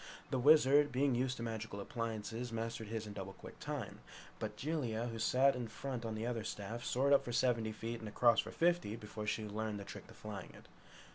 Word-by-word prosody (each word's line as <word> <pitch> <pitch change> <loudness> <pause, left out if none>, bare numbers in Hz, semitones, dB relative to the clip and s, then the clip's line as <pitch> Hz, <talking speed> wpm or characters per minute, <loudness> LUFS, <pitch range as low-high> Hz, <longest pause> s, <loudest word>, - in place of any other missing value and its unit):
The 130 - +1
Wizard, 145 +1 +6
being 135 +1 +3
used 130 +2 0
to 115 - -4
magic 115 -2 -4
appliances, 115 +3 -3
mastered 115 -1 -3
his 110 0 -3
in 105 - -7
double 95 -1 -6
quick - - -12
time. - - -4 0.4
But 105 -1 -4
Jellia, 125 -7 -1
who 115 -1 -5
sat 130 +5 +4
in 125 -2 -3
front 120 +1 -4
on 110 -1 -2
the 110 +1 -2
other 120 -2 -1
staff 110 +2 -4
soared 140 +3 +3
up 140 - +6
for 120 - -4
seventy 115 -2 +2
feet 115 +2 -4
and 110 - -6
across 115 +2 +5
for - - 0
fifty 170 -10 +2
before 105 -1 -6
she 110 +1 0
learned 105 0 -3
the - - -5
trick - - -9
of - - -14
flying 105 -4 -6
it. - - -15
115 Hz, 215 wpm, -36 LUFS, 110-125 Hz, 0.4 s, Wizard